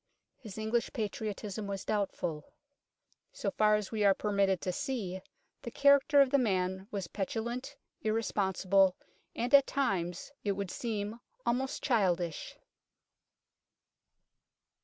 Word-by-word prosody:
His 215 Hz, -4 st, -10 dB
English 220 Hz, +2 st, -1 dB
patriotism 210 Hz, -2 st, -4 dB
was 195 Hz, -1 st, -4 dB
doubtful. 180 Hz, -7 st, -2 dB, 0.8 s
So -, -, -3 dB
far 215 Hz, 0 st, +4 dB
as 210 Hz, -2 st, -3 dB
we 215 Hz, -2 st, 0 dB
are 195 Hz, -1 st, +5 dB
per 210 Hz, -, -2 dB
mitted 195 Hz, -2 st, +2 dB
to 185 Hz, -, -1 dB
see, 205 Hz, -6 st, -3 dB, 0.4 s
the -, -, -6 dB
character 280 Hz, +3 st, +5 dB
of 270 Hz, -2 st, +3 dB
the 280 Hz, -, +4 dB
man 190 Hz, -4 st, 0 dB
was 200 Hz, -5 st, -3 dB
petulant, 235 Hz, +9 st, -4 dB, 0.3 s
irresponsible, 195 Hz, -3 st, +2 dB, 0.4 s
at 265 Hz, +3 st, +5 dB
times 190 Hz, -8 st, -1 dB
it 205 Hz, -, +1 dB
would 195 Hz, -1 st, -4 dB
seem 220 Hz, -1 st, -3 dB, 0.3 s
almost 260 Hz, +3 st, -1 dB
childish. 180 Hz, -, 0 dB
210 Hz, 115 wpm, -31 LUFS, 190-240 Hz, 0.8 s, are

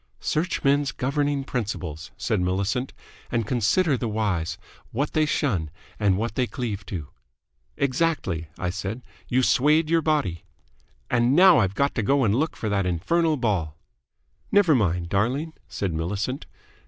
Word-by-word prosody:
"Search 170 Hz, +4 st, -1 dB
men's 140 Hz, -1 st, +3 dB
governing 140 Hz, +2 st, -1 dB
principles," 95 Hz, -, -4 dB
said -, -, 0 dB
Millicent, 100 Hz, +8 st, -1 dB, 0.4 s
"and 115 Hz, -2 st, 0 dB
consider 130 Hz, -, +2 dB
the 120 Hz, -1 st, -2 dB
wise, 105 Hz, -7 st, -1 dB, 0.3 s
what 140 Hz, +5 st, -2 dB
they 155 Hz, -1 st, +2 dB
shun 100 Hz, -, 0 dB, 0.3 s
and 100 Hz, -3 st, +3 dB
what 110 Hz, 0 st, -2 dB
they 125 Hz, +1 st, 0 dB
cleave 110 Hz, -6 st, -4 dB
to." 80 Hz, -7 st, -5 dB, 0.7 s
"Exactly," 140 Hz, -, 0 dB
I 90 Hz, -1 st, -2 dB
said. 100 Hz, +6 st, -5 dB, 0.2 s
"You 130 Hz, +1 st, +2 dB
swayed 150 Hz, +6 st, +3 dB
your 165 Hz, 0 st, +4 dB
body." 145 Hz, -, 0 dB, 0.7 s
"And 120 Hz, +2 st, +3 dB
now 185 Hz, -1 st, +7 dB
I've 95 Hz, 0 st, +1 dB
got 140 Hz, +5 st, +1 dB
to -, -, -1 dB
go 135 Hz, +6 st, +2 dB
and 105 Hz, -4 st, +3 dB
look 155 Hz, +7 st, 0 dB
for 110 Hz, -, -4 dB
that 100 Hz, -3 st, +1 dB
infernal 155 Hz, -, +1 dB
ball." 95 Hz, -, -1 dB, 0.7 s
"Never 200 Hz, -6 st, +5 dB
mind, 90 Hz, -, +1 dB
darling," 130 Hz, -, 0 dB
said 95 Hz, -4 st, -3 dB
Millicent. 100 Hz, -, -3 dB
120 Hz, 150 wpm, -25 LUFS, 95-145 Hz, 0.7 s, now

